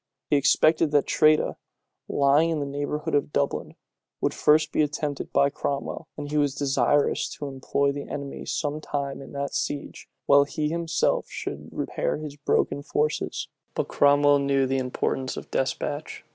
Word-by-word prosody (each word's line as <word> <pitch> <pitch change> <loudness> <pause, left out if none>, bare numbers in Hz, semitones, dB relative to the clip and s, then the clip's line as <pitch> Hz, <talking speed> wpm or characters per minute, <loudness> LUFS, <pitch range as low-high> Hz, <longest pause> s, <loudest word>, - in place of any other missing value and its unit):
He - - +5
expected 155 +3 +4
that 145 -1 +3
Tredah, 155 -1 +3 0.5
lying 145 +4 +3
in 160 -2 0
the 145 - -2
neighborhood 145 +2 -3
of 145 0 +1
Dublin, 140 -1 -1 0.4
would - - 0
first 155 +1 +3
be - - +2
attempted 150 -1 -2
by 140 0 +3
Cromwell, 140 +3 -3
and 145 -1 -6
he 150 - +2
was 145 -2 +1
desirous 140 0 +2
to 145 - -6
employ 140 +1 0
the 140 0 -6
enemy 140 -1 -6
some 150 0 -2
time 140 -2 -3
in - - -11
that 140 0 -3
siege, 145 -1 -4 0.2
while 140 0 +6
he 150 +1 -2
himself 170 0 0
should - - -6
repair - - -2
his 150 -1 -7
broken 140 0 0
forces. 150 +1 -1 0.3
But - - -1
Cromwell 145 0 +5
knew 140 -1 +2
the 135 +1 0
importance 130 +1 -2
of - - -8
despatch. 145 +3 -2
145 Hz, 160 wpm, -26 LUFS, 140-150 Hz, 0.5 s, while